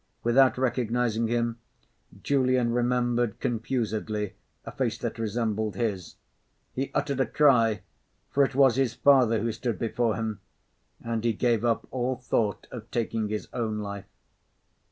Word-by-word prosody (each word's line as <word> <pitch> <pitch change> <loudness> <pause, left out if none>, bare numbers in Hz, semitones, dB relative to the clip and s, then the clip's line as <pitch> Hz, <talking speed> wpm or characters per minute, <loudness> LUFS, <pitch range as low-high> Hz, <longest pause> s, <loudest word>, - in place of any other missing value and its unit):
Without 130 +3 +4
recognising 120 -2 0
him, 115 0 -1 0.6
Julian 130 -3 +2
remembered 120 -2 +1
confusedly 110 -3 -2 0.3
a - - -6
face - - -1
that - - -4
resembled 110 -1 -1
his. 105 -7 -3 0.6
He 135 +1 -2
uttered 140 -2 0
a 135 - +2
cry; 115 -8 +3 0.5
for 140 - +4
it 135 -1 -1
was 135 -3 +5
his 130 -4 +1
father 125 -6 +4
who 115 +1 0
stood 115 +1 -3
before 115 -1 0
him; 110 -3 -3 0.6
and 115 -1 -2
he 115 -1 +2
gave 115 0 +1
up 115 -1 0
all 130 0 -1
thought 115 -4 -1
of 115 -2 -8
taking 115 -2 -1
his 105 0 -3
own 110 -3 -2
life. 100 -1 -5
115 Hz, 140 wpm, -27 LUFS, 110-125 Hz, 0.6 s, was